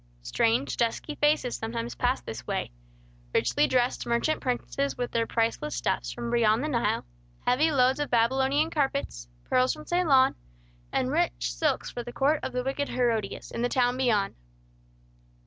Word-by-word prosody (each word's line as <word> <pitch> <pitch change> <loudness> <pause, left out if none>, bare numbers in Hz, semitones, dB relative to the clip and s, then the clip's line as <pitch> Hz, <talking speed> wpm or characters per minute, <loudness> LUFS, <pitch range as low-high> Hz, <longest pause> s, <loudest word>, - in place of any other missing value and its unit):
Strange, 230 - +1
dusky 235 +6 -1
faces 295 -4 +1
sometimes 230 +1 -4
passed 250 +1 -1
this 110 - -7
way; - - -2 0.6
richly - - +3
dressed 250 -1 0
merchant 235 +7 +1
princes 270 +2 -2
with 245 -1 -3
their 230 -1 0
priceless 230 +6 -1
stuffs - - -1
from 235 -1 -5
beyond 230 0 +3
the - - -1
Nile; 240 - 0 0.4
heavy 285 +6 +3
loads 265 -2 +3
of 290 - -1
Babylonian 265 +6 +2
carpets; 275 - -2 0.2
pearls 255 +2 +2
from 305 - -11
Ceylon, 310 -7 +4 0.6
and - - 0
rich - - 0
silks - - -1
for 240 - -5
the 240 0 -8
court 285 +4 +2
of - - -4
the 250 0 -2
wicked 275 +2 -2
Herodias, 230 -5 -1
in - - -4
the 245 - +1
town 245 -1 +2
beyond. 235 -6 +1
250 Hz, 160 wpm, -27 LUFS, 230-275 Hz, 0.6 s, Ceylon